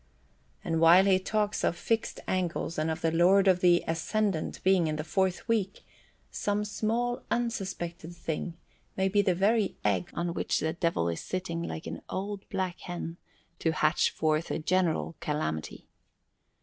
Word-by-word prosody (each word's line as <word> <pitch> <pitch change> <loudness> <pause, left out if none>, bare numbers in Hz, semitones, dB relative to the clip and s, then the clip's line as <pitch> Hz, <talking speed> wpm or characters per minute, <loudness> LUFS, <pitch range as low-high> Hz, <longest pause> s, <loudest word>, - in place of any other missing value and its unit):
And 165 0 0
while 175 +4 +7
he 190 -1 +4
talks 210 +2 -1
of 175 - +1
fixed 225 +5 -1
angles 175 -3 -1
and 155 +1 0
of 160 - -3
the 165 - +1
Lord 185 +4 +5
of 185 -1 +5
the 175 -1 +4
Ascendant 170 +2 -1
being 185 -3 +4
in 155 - -1
the 155 - -3
fourth 190 +5 0
week, 210 -4 -1 0.5
some 205 0 -1
small 230 +4 -1
unsuspected 185 -8 -3
thing 170 0 -4 0.4
may 190 0 +2
be 205 +1 +3
the 185 -3 +2
very 205 +2 +2
egg 100 -4 +1
on 170 0 -1
which - - 0
the 160 +1 -1
Devil 165 - 0
is 85 -1 -2
sitting 180 -2 -3
like 165 -1 -5
an - - -6
old 200 +1 -4
black 185 -3 -2
hen 175 -2 -6 0.4
to 160 - +1
hatch 155 +1 +3
forth 155 +1 0
a - - -1
general 170 0 0
calamity. 80 - -3
175 Hz, 160 wpm, -29 LUFS, 165-195 Hz, 0.5 s, while